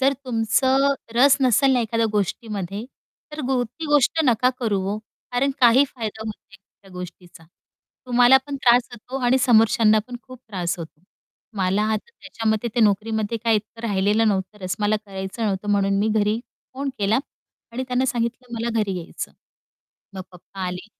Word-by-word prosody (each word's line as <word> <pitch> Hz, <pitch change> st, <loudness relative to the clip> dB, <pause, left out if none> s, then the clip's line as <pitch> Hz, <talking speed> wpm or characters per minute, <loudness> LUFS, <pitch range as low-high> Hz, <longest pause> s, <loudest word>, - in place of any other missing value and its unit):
जर 270 Hz, +1 st, +4 dB
तुमचं 260 Hz, +4 st, +2 dB, 0.2 s
रस 275 Hz, +3 st, +6 dB
नसेल 265 Hz, +1 st, +4 dB
ना 250 Hz, -, +3 dB
एखाद्या 230 Hz, 0 st, 0 dB
गोष्टीमध्ये, 205 Hz, 0 st, -3 dB, 0.5 s
तर 300 Hz, -, -5 dB, 0.2 s
ती 245 Hz, +8 st, -9 dB
गोष्ट 295 Hz, +2 st, +3 dB
नका 250 Hz, -1 st, +3 dB
करू 210 Hz, -5 st, 0 dB
ओ, -, -, -4 dB, 0.3 s
कारण 260 Hz, +3 st, +1 dB
काही 250 Hz, +3 st, +6 dB
फायदा 220 Hz, -4 st, -6 dB
होत 220 Hz, -, -3 dB
नाही 195 Hz, -, -20 dB, 0.3 s
त्या 195 Hz, -, -17 dB
गोष्टीचा. 180 Hz, -2 st, -10 dB, 0.6 s
तुम्हाला 245 Hz, +1 st, +6 dB
पण 285 Hz, -1 st, -4 dB
त्रास 240 Hz, 0 st, +4 dB
होतो 245 Hz, +3 st, -7 dB
आणि 250 Hz, +2 st, +4 dB
समोरच्यांना 225 Hz, -3 st, +4 dB
पण 250 Hz, -1 st, -7 dB
खूप 255 Hz, -1 st, -13 dB
त्रास 180 Hz, -4 st, -3 dB
होतो. 160 Hz, -2 st, -9 dB, 0.6 s
मला 190 Hz, +2 st, +1 dB
आता 215 Hz, -, -4 dB
त्याच्यामध्ये 225 Hz, -, -2 dB
ते 240 Hz, -, +1 dB
नोकरीमध्ये 220 Hz, +1 st, +1 dB
काही 225 Hz, -1 st, +4 dB
इतकं 225 Hz, +2 st, -6 dB
राहिलेलं 205 Hz, +2 st, +2 dB
नव्हतं 195 Hz, 0 st, -2 dB
रस, 185 Hz, 0 st, -1 dB
मला 210 Hz, +1 st, +2 dB
करायचं 190 Hz, +3 st, -6 dB
नव्हतं 200 Hz, -1 st, -2 dB
म्हणून 200 Hz, -1 st, +2 dB
मी 210 Hz, +2 st, +1 dB
घरी 210 Hz, +1 st, +1 dB, 0.4 s
फोन 275 Hz, +1 st, -3 dB
केला 205 Hz, +3 st, +2 dB, 0.5 s
आणि 250 Hz, +3 st, -3 dB
त्यानं 250 Hz, +1 st, +1 dB
सांगितलं, 240 Hz, 0 st, -2 dB
"मला 230 Hz, +1 st, -2 dB
घरी 195 Hz, -3 st, -1 dB
यायचं." 170 Hz, -, -7 dB, 0.8 s
मग 190 Hz, -, -5 dB
पप्पा 180 Hz, +2 st, -13 dB
आले, 180 Hz, +2 st, -5 dB
225 Hz, 165 wpm, -22 LUFS, 200-245 Hz, 0.8 s, रस